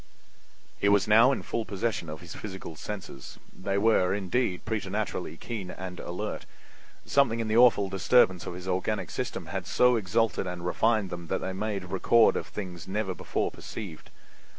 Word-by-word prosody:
He 100 Hz, -, +3 dB
was 100 Hz, 0 st, +4 dB
now 115 Hz, +5 st, +7 dB
in 135 Hz, -, -2 dB
full 115 Hz, -, -2 dB
possession 100 Hz, -4 st, -2 dB
of 75 Hz, +2 st, -7 dB
his 85 Hz, -2 st, -9 dB
physical 95 Hz, -5 st, -7 dB
senses. 95 Hz, -7 st, -7 dB, 0.2 s
They 100 Hz, +1 st, -2 dB
were, 100 Hz, -3 st, +3 dB
indeed, 100 Hz, 0 st, -1 dB
preternaturally 105 Hz, -5 st, -3 dB
keen 105 Hz, -4 st, -5 dB
and 90 Hz, -1 st, -7 dB
alert. 95 Hz, +5 st, -5 dB, 0.6 s
Something 120 Hz, -5 st, +3 dB
in 115 Hz, -, -1 dB
the 110 Hz, +1 st, +2 dB
awful 120 Hz, -5 st, +6 dB
disturbance 95 Hz, -1 st, +3 dB
of -, -, -5 dB
his 90 Hz, +1 st, -8 dB
organic 95 Hz, 0 st, -1 dB
system -, -, -4 dB
had -, -, -5 dB
so 125 Hz, -1 st, +4 dB
exalted 110 Hz, 0 st, 0 dB
and 90 Hz, -1 st, -5 dB
refined 110 Hz, +1 st, +1 dB
them 85 Hz, -1 st, -6 dB
that -, -, -1 dB
they 95 Hz, -, -3 dB
made 100 Hz, -1 st, -3 dB
record 110 Hz, +4 st, +4 dB
of -, -, -3 dB
things 90 Hz, -5 st, -7 dB
never 95 Hz, -1 st, -1 dB
before -, -, -2 dB
perceived. 95 Hz, -8 st, -8 dB
100 Hz, 170 wpm, -28 LUFS, 90-110 Hz, 0.6 s, now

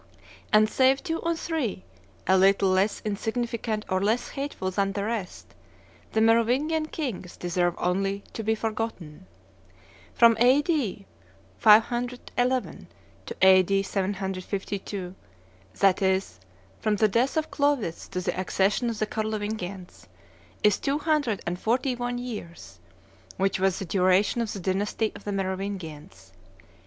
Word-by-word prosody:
And 215 Hz, 0 st, +6 dB
save 265 Hz, +4 st, +3 dB
two 330 Hz, -3 st, -2 dB
or 335 Hz, 0 st, -1 dB
three, 305 Hz, -, -3 dB, 0.4 s
a 190 Hz, -, +4 dB
little 195 Hz, +1 st, +4 dB
less 190 Hz, +3 st, +1 dB
insignificant 220 Hz, +1 st, -2 dB
or 185 Hz, 0 st, 0 dB
less 220 Hz, +5 st, 0 dB
hateful 275 Hz, -9 st, -4 dB
than 195 Hz, +1 st, 0 dB
the 200 Hz, -, -2 dB
rest, 210 Hz, -4 st, -5 dB, 0.6 s
the 220 Hz, -, +2 dB
Merovingian 250 Hz, +8 st, +2 dB
kings 245 Hz, -, -5 dB
deserve 175 Hz, 0 st, 0 dB
only 195 Hz, +2 st, -1 dB
to -, -, -4 dB
be 220 Hz, +1 st, +1 dB
forgotten. 215 Hz, -7 st, -5 dB, 0.9 s
From 230 Hz, -1 st, +6 dB
A.D. 255 Hz, -, +2 dB, 0.5 s
511 245 Hz, +3 st, +2 dB, 0.4 s
to -, -, -5 dB
A.D. 190 Hz, +1 st, +5 dB
752, 195 Hz, -1 st, -3 dB, 0.6 s
that 195 Hz, -1 st, +3 dB
is, 190 Hz, -, 0 dB, 0.4 s
from 215 Hz, -1 st, +1 dB
the 215 Hz, +1 st, +3 dB
death 240 Hz, +8 st, +1 dB
of 315 Hz, -, -1 dB
Clovis 285 Hz, -, 0 dB
to 180 Hz, -1 st, -4 dB
the 180 Hz, -, -2 dB
accession 195 Hz, +5 st, +1 dB
of 230 Hz, -, -4 dB
the 215 Hz, -, 0 dB
Carlovingians, 210 Hz, -4 st, -5 dB, 0.6 s
is 210 Hz, -2 st, +4 dB
two 275 Hz, +1 st, 0 dB
hundred 295 Hz, -, 0 dB
and 175 Hz, +1 st, -3 dB
forty 250 Hz, +5 st, +1 dB
one 245 Hz, 0 st, -3 dB
years, 175 Hz, -, -8 dB, 0.6 s
which 195 Hz, 0 st, +1 dB
was 190 Hz, -1 st, +2 dB
the 195 Hz, -, -4 dB
duration 185 Hz, +5 st, +2 dB
of 225 Hz, -, -2 dB
the 200 Hz, -, -5 dB
dynasty 200 Hz, +4 st, -1 dB
of -, -, -12 dB
the 205 Hz, -, -2 dB
Merovingians. 185 Hz, -, -5 dB
205 Hz, 130 wpm, -26 LUFS, 190-240 Hz, 0.9 s, And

